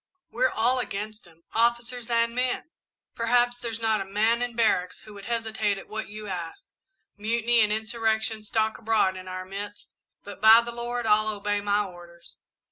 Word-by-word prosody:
"We're 255 +2 +2
all 245 +3 +1
against 210 -3 -5
him 165 0 -22
officers 235 +1 0
and 230 0 +2
men. 250 +5 -1 0.4
Perhaps 245 +1 +2
there's 230 -2 -4
not 220 -2 +1
a - - -1
man 215 +4 +1
in 245 -1 -2
barracks 185 -6 +1
who 215 - -13
would 200 -1 -11
hesitate 220 -3 -1
at 195 - -10
what 220 0 -5
you 215 +1 -8
ask 175 -4 -6 0.5
mutiny 230 +2 +2
and 210 -1 +3
insurrection 220 0 0
stalk 220 +1 -1
abroad 220 -4 +2
in 185 0 -9
our 185 0 -5
midst, 200 +2 -8 0.3
but, 200 0 -10
by 220 +1 +9
the 235 0 -6
Lord, 240 0 -3
I'll 215 0 +3
obey 205 -1 -1
my 205 0 +1
orders! 175 -2 -13
220 Hz, 175 wpm, -26 LUFS, 205-235 Hz, 0.5 s, by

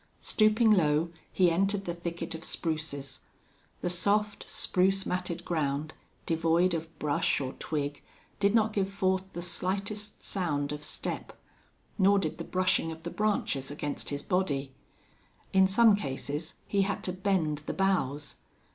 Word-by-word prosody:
Stooping 215 +1 +4
low, 165 -3 +3 0.2
he 180 -2 +4
entered 195 +3 +1
the 175 - -2
thicket 170 -1 -4
of 160 0 -7
spruces. 150 -6 -3 0.6
The 175 - 0
soft, 205 +3 +1
spruce 190 +1 +2
matted 180 -1 -3
ground, 155 -2 -1 0.3
devoid 165 +2 +2
of 165 -1 -4
brush 150 -2 +1
or 130 -2 -3
twig, 145 -2 -2 0.4
did 200 +2 +3
not 220 -1 +3
give 195 -2 +1
forth 190 -1 0
the 175 - -4
slightest 200 +4 -3
sound 150 -7 -1
of 150 0 -5
step, 150 - -4 0.6
nor 200 +1 +6
did 195 - -1
the - - -3
brushing 185 -3 +1
of 160 0 -9
the 170 - -4
branches 200 -10 0
against 145 0 -3
his 145 0 -3
body. 145 -8 0 0.8
In 190 0 +6
some 215 +2 +6
cases 145 -2 -4
he 200 - +1
had 200 +1 -1
to 180 - -2
bend 185 -6 0
the - - 0
boughs. 150 -7 0
175 Hz, 145 wpm, -30 LUFS, 150-195 Hz, 0.8 s, nor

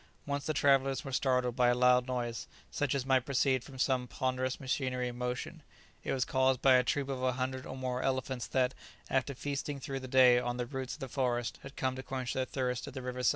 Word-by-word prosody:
Once 140 0 -3
the - - +2
travellers 135 -2 +3
were 135 - -5
startled 125 -2 +1
by 125 -2 +4
a 120 - +4
loud 125 0 +4
noise, 120 -2 -3 0.2
such 145 -2 0
as 135 -2 -1
might 130 -2 +3
proceed 130 -1 +1
from 135 - -11
some 130 -1 +1
ponderous 130 +1 -1
machinery 130 -2 -1
in 120 - -8
motion: 125 0 -4 0.4
it - - -2
was 130 -2 +1
caused 130 -1 +2
by 135 - +5
a 125 0 +6
troop 140 +2 0
of 135 -2 -3
a 130 0 +1
hundred 130 +1 -3
or 130 - -6
more 130 -1 -2
elephants 130 -2 -1
that, 130 -1 +1 0.4
after 135 +1 0
feasting 140 +1 -3
through 135 0 -4
the 130 - -7
day 125 -1 +6
on 120 0 -2
the 125 - -1
roots 130 0 -5
of 155 - -17
the 135 - -3
forest, 120 -2 -1
had 140 - -10
come 130 -1 -1
to 130 - -5
quench 130 -2 -4
their 130 - 0
thirst 125 -2 -2
at - - -9
the 130 - -4
river 125 0 -4
side. - - +4
130 Hz, 240 wpm, -32 LUFS, 125-135 Hz, 0.4 s, a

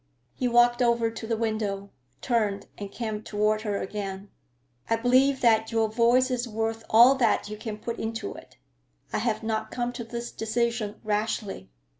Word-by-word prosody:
He 255 - -1
walked 240 0 +4
over 235 -1 +2
to 225 0 -7
the 225 -1 0
window, 210 -3 -2 0.3
turned, 210 -5 0
and 200 -1 -7
came 220 -3 -4
toward 215 0 0
her 210 -2 -2
again. 195 -1 -5 0.6
"I 225 - +4
believe 255 +4 +3
that 225 -2 +3
your 225 -1 +2
voice 240 +3 +3
is 250 -1 -1
worth 225 0 -2
all 235 +4 +8
that 235 -4 +2
you 210 - -5
can 215 0 -6
put 230 +2 -5
into 225 - -4
it. - - -14 0.6
I - - +1
have 220 -1 -1
not 220 -1 -2
come 245 0 -2
to 240 - -5
this 235 +1 -6
decision 225 -1 -2
rashly. 210 - -2
225 Hz, 170 wpm, -27 LUFS, 210-235 Hz, 0.6 s, all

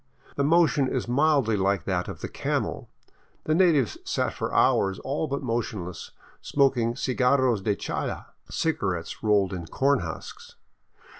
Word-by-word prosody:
The 140 - 0
motion 150 -3 +3
is 125 - -2
mildly 135 -3 +2
like 100 0 +1
that 90 -2 -1
of - - -8
the - - -3
camel. - - -3 0.5
The 155 - 0
natives 160 - +3
sat - - -1
for - - -4
hours 95 -1 +3
all 145 +4 -2
but 140 -1 -3
motionless, 105 -8 -3 0.3
smoking 125 -5 +1
cigarros 125 -3 +2
de 105 +1 0
chala, - - -4 0.2
cigarettes 95 - -2
rolled 100 -3 +2
in 85 -3 -5
corn 140 - +2
husks. 480 0 -8
125 Hz, 140 wpm, -26 LUFS, 100-140 Hz, 0.5 s, motion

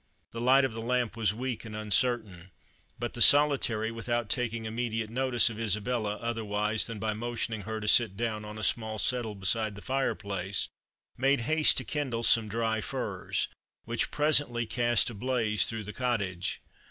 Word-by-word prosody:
The 115 - -6
light 135 +3 +5
of 125 - -3
the 115 - -5
lamp 120 0 -1
was 110 -4 +1
weak 125 +2 -4
and 110 -2 -8
uncertain; 105 -4 0 0.5
but 120 0 -4
the 120 - -6
Solitary, 130 -6 +4
without 115 -1 -2
taking 115 -3 -1
immediate 115 -1 -3
notice 125 -1 +3
of 110 - -8
Isabella, 110 0 -1
otherwise 110 -2 -1
than 115 -2 -6
by 110 +1 -2
motioning 115 -1 -3
her 110 +2 -5
to 105 - -5
sit 110 -3 +5
down 110 -2 -2
on 105 0 -8
a 110 - -5
small 110 -1 0
settle 120 -2 0
beside 105 +2 0
the 100 - -10
fireplace, 100 -8 -1 0.5
made 135 0 +2
haste 155 +5 +3
to 130 - +2
kindle 125 -2 -3
some 115 -1 +5
dry 110 0 -1
furze, - - -2 0.4
which 115 0 -1
presently 145 -6 +1
cast 120 +2 +2
a - - -9
blaze 110 -1 +1
through 110 -1 -4
the 105 +1 -8
cottage. 100 -8 -2
115 Hz, 170 wpm, -29 LUFS, 105-120 Hz, 0.5 s, light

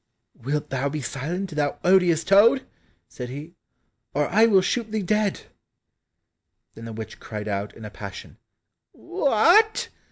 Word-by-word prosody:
"Wilt 145 +4 -4
thou 135 +1 -1
be 155 +2 -4
silent, 165 +8 -4
thou 150 -2 -1
odious 180 -3 +4
toad," 230 +7 +5 0.4
said 125 -1 -8
he, 145 +6 -8 0.6
"or 145 0 +1
I 220 +4 +5
will 195 -4 +5
shoot 225 +2 -1
thee 215 -2 -1
dead." 210 +1 0 1.3
Then 115 - -10
the 115 - -7
witch 110 0 -8
cried 105 -2 -7
out 100 0 -3
in 110 - -9
a 105 - -8
passion, 100 -1 -9 0.6
"What! 350 - +3
165 Hz, 140 wpm, -24 LUFS, 125-215 Hz, 1.3 s, toad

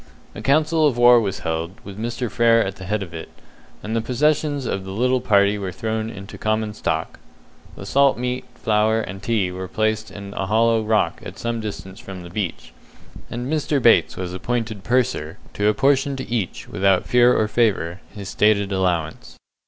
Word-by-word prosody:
A - - -8
council 155 +2 +3
of 130 -5 -1
war 120 0 +7
was 100 -3 -3
held, 80 +2 -3
with 100 - -9
Mr. 120 +3 -3
Frere 115 -1 +4
at 95 0 -5
the 95 - -9
head 105 +2 -1
of 85 -3 -11
it, 80 - -7 0.5
and 110 +2 -3
the 115 - +1
possessions 145 +3 0
of 95 -4 -2
the 95 - -8
little 125 +6 +1
party 100 -3 +3
were 95 -2 -4
thrown 110 +3 -3
into 100 -2 -9
common 110 0 -1
stock. 80 -6 -3 0.6
The - - -9
salt 140 -1 +3
meat, 125 +1 -3
flour, 110 0 +2
and 95 -3 -7
tea 100 -4 0
were 95 +1 -6
placed 110 +2 -1
in 100 0 -9
a 95 - -3
hollow 115 +2 +3
rock 110 0 +1
at - - -9
some 115 0 -2
distance 100 -3 -7
from 95 -2 -9
the 85 - -10
beach, 95 -3 -4 0.6
and 120 +1 -4
Mr. 150 0 0
Bates 115 -2 +4
was 90 -1 -4
appointed 110 +1 -3
purser, 105 -10 0 0.2
to 105 - 0
apportion 135 +4 +2
to 130 - -6
each, 115 -6 -3
without 95 -2 +2
fear 125 0 +4
or 110 - +2
favour, 100 -6 0
his 100 -2 -8
stated 100 -1 +2
allowance. 90 -4 -2
110 Hz, 185 wpm, -22 LUFS, 95-120 Hz, 0.6 s, war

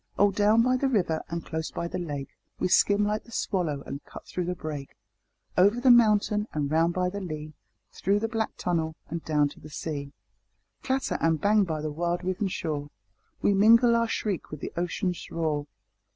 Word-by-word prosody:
Oh 205 0 +5
down 210 +3 +4
by 255 +1 +3
the 275 - +1
river 180 -10 +1
and 170 0 -4
close 160 0 -3
by 170 - -4
the 180 - -4
lake 145 -6 -4 0.3
We - - 0
skim 205 +3 +4
like 210 +1 -1
the 235 - -16
swallow 165 -10 -1
and 140 +1 -6
cut - - -11
though 180 - 0
the 180 +1 -2
brake; 150 -4 -6 0.6
Over 200 +6 +4
the 250 0 +6
mountain 210 -2 +4
and 145 -2 -1
round 165 +2 +2
by 180 0 0
the 200 +1 -5
lea, 155 -4 -6 0.5
Though 200 +2 +3
the 225 +2 -1
black 225 -1 -2
tunnel 160 -3 -1
and 165 0 -4
down 150 -2 +2
to - - -14
the 155 - -11
sea. 145 -2 -5 0.7
Clatter 265 0 -1
and 165 -1 +2
bang 205 +3 +4
by 160 -3 -3
the 155 - -2
wild 175 +3 -1
riven 185 +2 -1
shore, 150 -5 -3 0.5
We 205 - +4
mingle 230 +4 +6
our 230 0 +2
shriek 205 -5 -2
with 150 - -7
the - - -6
ocean's 175 +1 -2
roar. 155 -3 -1
180 Hz, 195 wpm, -27 LUFS, 155-210 Hz, 0.7 s, the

